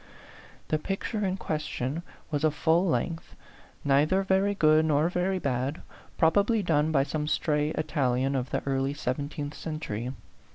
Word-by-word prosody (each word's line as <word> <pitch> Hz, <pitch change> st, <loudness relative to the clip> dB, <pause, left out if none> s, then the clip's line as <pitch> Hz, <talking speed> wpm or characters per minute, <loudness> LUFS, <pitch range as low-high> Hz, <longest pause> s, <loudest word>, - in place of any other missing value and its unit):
The 155 Hz, -, +1 dB
picture 200 Hz, +5 st, -3 dB
in 190 Hz, -1 st, 0 dB
question 150 Hz, -3 st, -3 dB, 0.3 s
was 145 Hz, -1 st, -1 dB
a 155 Hz, -, +5 dB
full 160 Hz, +4 st, +2 dB
length, 165 Hz, 0 st, -2 dB, 0.5 s
neither 150 Hz, +7 st, +3 dB
very 195 Hz, +1 st, +2 dB
good 155 Hz, -3 st, +5 dB
nor 155 Hz, +1 st, +3 dB
very 185 Hz, +2 st, 0 dB
bad, 135 Hz, -1 st, -2 dB, 0.3 s
probably 205 Hz, +6 st, +3 dB
done 155 Hz, -2 st, +2 dB
by 135 Hz, -3 st, +3 dB
some 150 Hz, +2 st, -3 dB
stray 150 Hz, -1 st, +1 dB
Italian 135 Hz, -3 st, 0 dB
of 130 Hz, -1 st, -1 dB
the -, -, -2 dB
early 135 Hz, 0 st, 0 dB
sev 125 Hz, -3 st, -2 dB
enteenth 145 Hz, 0 st, -5 dB
century. 130 Hz, -9 st, -4 dB
155 Hz, 150 wpm, -28 LUFS, 140-175 Hz, 0.5 s, a